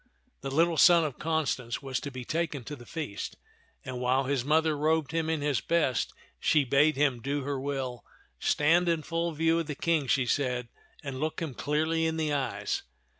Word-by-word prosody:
The 135 - -4
little 165 +4 +2
son 175 -1 +7
of 145 -5 -5
Constance 145 -7 -1
was 130 -3 -2
to 140 - -5
be 130 -2 -7
taken 155 -4 -2
to 145 +5 -6
the 120 -3 -14
feast, 150 -11 -5 0.5
and 130 -1 -5
while 130 +2 +2
his 135 -2 0
mother 155 +2 +2
robed 155 0 +1
him 165 -1 -1
in 160 -2 0
his 145 -2 0
best, 160 -7 +1 0.3
she 150 -2 +3
bade 140 +4 +3
him 135 -4 +1
do 140 +3 -1
her 140 0 -2
will. 130 -3 -3 0.2
" - - -40
Stand 170 +4 +3
in 165 -2 0
full 165 +2 -1
view 165 +1 +2
of 165 - -3
the 150 - -4
King," 160 -2 +1
she 130 0 +2
said, 125 -2 -1 0.2
" - - -27
and 135 -3 -5
look 155 +2 -2
him 160 -5 -4
clearly 160 +4 0
in 160 0 -2
the 155 -2 0
eyes. 135 -4 -1
145 Hz, 205 wpm, -29 LUFS, 135-160 Hz, 0.5 s, son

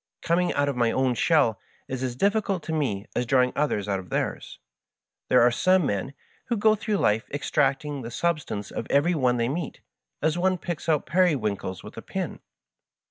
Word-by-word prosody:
Coming 175 +1 +2
out 145 0 +2
of 140 - -1
my 120 -2 +2
own 130 -1 +1
shell 120 - +2 0.3
is 130 -1 -4
as 125 -2 -3
difGieult 200 -1 +1
to 160 - -4
me 110 -10 -1
as 120 - 0
drawing 125 0 +3
others 125 -9 0
out 100 -1 0
of 90 -2 -11
theirs. - - -3 0.7
There - - +6
are 120 - +5
some 185 +6 +3
men 120 +5 -2 0.3
who 235 - -1
go 215 +1 +4
through 215 0 -1
life 105 - +1
extracting 145 0 0
the 115 - -6
sub 170 +6 0
stance 105 -7 -6
of 115 - -5
every 150 +6 +3
one 125 -6 +2
they 115 0 +1
meet, 150 +4 -4 0.4
as 160 +3 0
one 185 +1 +2
picks 170 0 -5
out 155 -3 +2
peri 175 +2 +3
winkles 100 -6 -3
with - - -11
a - - -5
pin. - - -4
140 Hz, 195 wpm, -26 LUFS, 120-170 Hz, 0.7 s, There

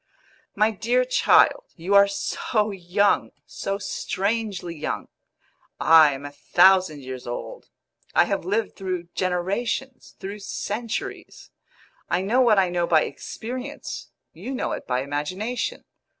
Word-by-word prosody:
"My 215 +2 +3
dear 245 +4 +1
child, - - +4
you 180 +3 -2
are 200 0 +7
so 210 +2 -1
young 195 +2 +1 0.2
so 195 0 -4
strangely 200 -4 -2
young. 155 0 -4 0.7
I 155 -3 +7
am 135 +1 -7
a 145 - -6
thousand 180 +1 +4
years 130 -1 -7
old; 120 - -6 0.5
I - - +6
have - - -2
lived 210 +5 -1
through 185 -3 -4
generations 200 +8 -2
through 200 +2 -6
centuries. 235 - -5 0.6
I 185 - +1
know 235 +7 +3
what 230 -4 +5
I 190 -1 +4
know 175 -1 0
by 160 -2 +4
experience; 255 +5 -6 0.2
you 265 - -6
know - - -2
it - - -5
by 125 0 0
imagination. 185 - -3
195 Hz, 130 wpm, -24 LUFS, 170-225 Hz, 0.7 s, are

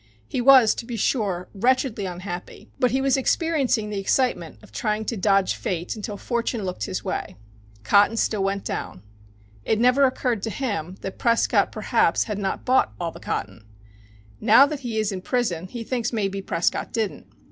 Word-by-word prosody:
He 250 - -2
was, 255 -3 +7
to 235 - -7
be 240 - -4
sure, 195 -6 0
wretchedly 240 -1 +1
unhappy, 180 0 -7
but 250 -2 +3
he 265 +3 0
was 270 0 +2
experiencing 265 -7 +1
the 205 - -2
excitement 195 - 0
of - - -16
trying 210 - -2
to 235 - -2
dodge 195 -1 +2
Fate 175 +2 -3
until 210 -1 -6
Fortune 235 0 -2
looked 180 - -3
his - - -4
way. - - -4 0.5
Cotton 205 - +4
still 210 -3 0
went 195 0 -2
down. 90 - -5 0.6
It 215 - +1
never 250 +3 +5
occurred 250 -4 0
to 225 - -2
him 205 - -3
that 190 - -6
Prescott 230 -1 +2
perhaps - - +1
had 210 -2 -4
not 195 -1 -3
bought 255 - +3
all - - -2
the - - -12
cotton. - - -4 0.8
Now 230 +5 +7
that 290 0 -4
he 240 -4 -4
is 215 -1 0
in 190 -1 -5
prison 185 -7 -1
he 230 +4 -6
thinks 240 0 -2
maybe 195 -4 -2
Prescott 170 -3 -1
didn't. 220 -4 -3
215 Hz, 180 wpm, -24 LUFS, 195-250 Hz, 0.8 s, was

